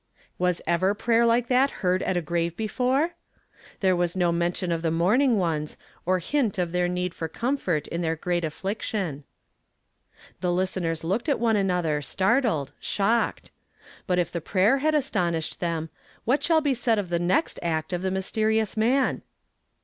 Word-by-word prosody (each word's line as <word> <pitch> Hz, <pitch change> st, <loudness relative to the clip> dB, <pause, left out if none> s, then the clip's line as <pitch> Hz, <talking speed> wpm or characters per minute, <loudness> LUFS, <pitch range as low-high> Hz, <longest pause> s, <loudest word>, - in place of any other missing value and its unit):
Was 180 Hz, -1 st, 0 dB
ever 185 Hz, +4 st, +2 dB
pmyer 235 Hz, +2 st, +3 dB
like 235 Hz, +1 st, +2 dB
that 260 Hz, +2 st, +4 dB, 0.2 s
heard 180 Hz, +1 st, +2 dB
at 185 Hz, -, 0 dB
a -, -, +1 dB
f,n 170 Hz, +1 st, -9 dB
ave 170 Hz, -, -9 dB
before? 255 Hz, -, 0 dB, 0.7 s
There 190 Hz, -2 st, +3 dB
was 175 Hz, 0 st, 0 dB
no 175 Hz, -2 st, +2 dB
mention 175 Hz, +1 st, -1 dB
of 165 Hz, -1 st, -1 dB
the 165 Hz, -, 0 dB
mourning 215 Hz, -, +3 dB
ones, 160 Hz, -5 st, -1 dB, 0.3 s
nor 185 Hz, 0 st, +3 dB
hint 225 Hz, -, 0 dB
of 175 Hz, -2 st, -1 dB
their 180 Hz, 0 st, +1 dB
need 180 Hz, 0 st, -2 dB
for 160 Hz, -, -4 dB
comfort 185 Hz, -, -1 dB
in 170 Hz, -, -3 dB
their 165 Hz, -1 st, 0 dB
great 175 Hz, +1 st, -1 dB
aflliction. 175 Hz, -2 st, -3 dB, 1.1 s
The 180 Hz, -, -2 dB
listenei 180 Hz, -1 st, 0 dB
s 160 Hz, -, -7 dB
looked 200 Hz, -, -1 dB
at 280 Hz, -, +1 dB
one 230 Hz, -1 st, +2 dB
another, 180 Hz, -6 st, +1 dB
startled, 190 Hz, -, +1 dB
shocked. 220 Hz, +4 st, 0 dB, 0.6 s
But 180 Hz, -2 st, +1 dB
if 175 Hz, -2 st, 0 dB
the 170 Hz, -, -3 dB
prayer 200 Hz, -, +2 dB
had 310 Hz, +2 st, +1 dB
astonished 170 Hz, -, -1 dB
them, 165 Hz, -2 st, -2 dB, 0.3 s
what 260 Hz, +5 st, +2 dB
shall 325 Hz, -2 st, +3 dB
be 290 Hz, -3 st, +1 dB
said 230 Hz, -2 st, +1 dB
of 200 Hz, -4 st, -2 dB
the 170 Hz, -1 st, 0 dB
next 185 Hz, -, +1 dB
ret 160 Hz, 0 st, -2 dB
of 175 Hz, -, -1 dB
this 190 Hz, 0 st, -1 dB
mysteri 215 Hz, +3 st, +1 dB
ous 220 Hz, -3 st, -2 dB
man? 250 Hz, +5 st, +2 dB
185 Hz, 180 wpm, -25 LUFS, 170-230 Hz, 1.1 s, that